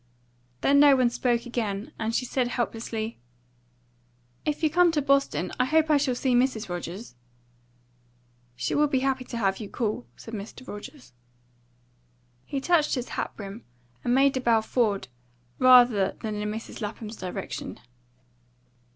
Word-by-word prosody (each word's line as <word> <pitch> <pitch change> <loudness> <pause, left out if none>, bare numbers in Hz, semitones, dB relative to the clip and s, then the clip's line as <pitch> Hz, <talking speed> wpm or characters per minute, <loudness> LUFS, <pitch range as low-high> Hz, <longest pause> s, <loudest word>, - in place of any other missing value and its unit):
Then 280 +1 +4
no 285 -1 +8
one 250 -2 +3
spoke 240 -1 0
again, 220 -4 -3
and 225 0 -1
she 250 - 0
said 250 0 0
helplessly 225 -2 -3 1.3
"If 300 +1 -2
you 315 - +4
come 350 +1 +5
to 305 - +2
Boston, 275 - +1
I 250 - +4
hope 315 +3 +3
I 300 - +6
shall 275 -3 0
see 255 +1 0
Mrs. 245 -4 +1
Rogers." 175 +5 -6 1.4
"She - - -2
will 300 +1 +3
be 265 -2 0
happy 265 -1 0
to 235 - -6
have 195 -4 0
you 210 -3 -6
call," 210 - -2
said 225 - -11
Mr 220 +5 -8
Rogers. 210 - -10 1.3
He 275 - -3
touched 315 0 +2
his 250 -1 -4
hat - - -4
brim, 200 +2 -8 0.4
and 245 - +2
made 275 0 +4
a 260 - -1
bow 230 -2 +3
forward 220 - 0 0.5
rather 245 -6 +6
than 220 -2 -3
in 210 0 -3
Mrs. 220 +2 -6
Lapham's 215 +1 -6
direction. 185 -1 -5
240 Hz, 150 wpm, -26 LUFS, 215-270 Hz, 1.4 s, no